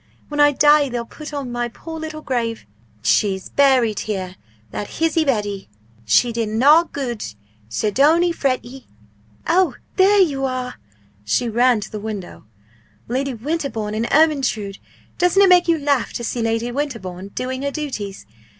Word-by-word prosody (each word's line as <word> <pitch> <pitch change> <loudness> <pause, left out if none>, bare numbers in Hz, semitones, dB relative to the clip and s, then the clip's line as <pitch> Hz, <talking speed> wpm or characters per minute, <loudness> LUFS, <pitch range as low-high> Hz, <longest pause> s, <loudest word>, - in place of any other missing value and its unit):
When 295 0 -4
I 290 0 +6
die 295 0 +4
they'll 240 -1 -3
put 305 +5 -10
on 280 -4 -4
my 240 0 -2
poor 320 +7 -9
little 310 -1 -6
grave 230 -4 -2 0.4
"She's 190 - +1
buried 260 -6 +3
here 190 -3 -4 0.4
that 205 - -5
hizzie 325 0 +2
Betty; 205 - -1 0.4
She 230 - +3
did 225 -2 -1
na 285 +10 +5
gude 250 -8 -4 0.5
so 210 - -1
don't 300 - +4
ee 350 - +2
fret 270 -7 -1
ye! 255 +1 -12 0.3
" - - -34 0.3
oh, 360 +2 +3 0.2
there 390 0 +6
they 305 - -4
are!" 255 -2 -3 0.4
she 170 - 0
ran 240 0 +3
to - - -8
the 215 - -5
window 205 - -7 0.6
"Lady 260 +2 -2
Winterbourne 240 -5 -3
and 225 +2 -1
Ermyntrude. 270 -10 +2 0.4
Doesn't 360 +3 +4
it 390 - +5
make 360 -1 +5
you 335 -1 +3
laugh 280 -4 0
to 235 - -4
see 235 +1 -2
Lady 225 +1 -1
Winterbourne 230 -10 -4
doing 260 +1 -3
her 280 - -1
duties? 265 -10 -5
255 Hz, 165 wpm, -20 LUFS, 220-295 Hz, 0.6 s, I